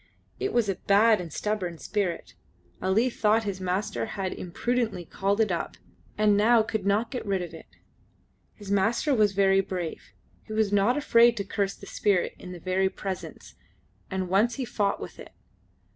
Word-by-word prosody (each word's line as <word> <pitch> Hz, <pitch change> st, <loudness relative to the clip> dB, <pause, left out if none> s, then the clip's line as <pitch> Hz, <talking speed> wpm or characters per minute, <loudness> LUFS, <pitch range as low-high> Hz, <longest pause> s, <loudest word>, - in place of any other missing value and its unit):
It 395 Hz, -, -1 dB
was 235 Hz, -3 st, +2 dB
a 195 Hz, -2 st, -1 dB
bad 210 Hz, +1 st, +4 dB
and 170 Hz, -3 st, -8 dB
stubborn 185 Hz, -2 st, -2 dB
spirit. 185 Hz, +4 st, -3 dB, 0.5 s
Ali 195 Hz, +6 st, +2 dB
thought 225 Hz, -2 st, +2 dB
his 195 Hz, -3 st, -4 dB
master 185 Hz, +4 st, -2 dB
had 190 Hz, -1 st, -2 dB
imprudently 220 Hz, +1 st, -2 dB
called 200 Hz, +5 st, -1 dB
it 215 Hz, -3 st, +2 dB
up, 170 Hz, -, -3 dB, 0.4 s
and 210 Hz, -1 st, +4 dB
now 220 Hz, +2 st, +5 dB
could 215 Hz, -2 st, -3 dB
not 210 Hz, +3 st, +1 dB
get 250 Hz, -, -4 dB
rid 195 Hz, -3 st, -1 dB
of 175 Hz, -, -8 dB
it. -, -, -11 dB, 0.9 s
His 205 Hz, -2 st, -8 dB
master 225 Hz, +9 st, +2 dB
was 210 Hz, -5 st, +3 dB
very 195 Hz, 0 st, +4 dB
brave; 180 Hz, -4 st, -4 dB, 0.4 s
he 215 Hz, -, -9 dB
was 215 Hz, -2 st, +1 dB
not 205 Hz, +6 st, +3 dB
afraid 235 Hz, -4 st, +5 dB
to 200 Hz, -, -1 dB
curse 195 Hz, 0 st, -2 dB
this -, -, -12 dB
spirit 195 Hz, -4 st, +1 dB
in 180 Hz, -, -9 dB
the 180 Hz, -, -8 dB
very 190 Hz, +2 st, +1 dB
Presence; 190 Hz, -1 st, -7 dB, 0.6 s
and 190 Hz, -1 st, -2 dB
once 210 Hz, +6 st, +2 dB
he 265 Hz, -, -3 dB
fought 210 Hz, -4 st, -1 dB
with -, -, -9 dB
it. -, -, -11 dB
200 Hz, 175 wpm, -27 LUFS, 190-220 Hz, 0.9 s, now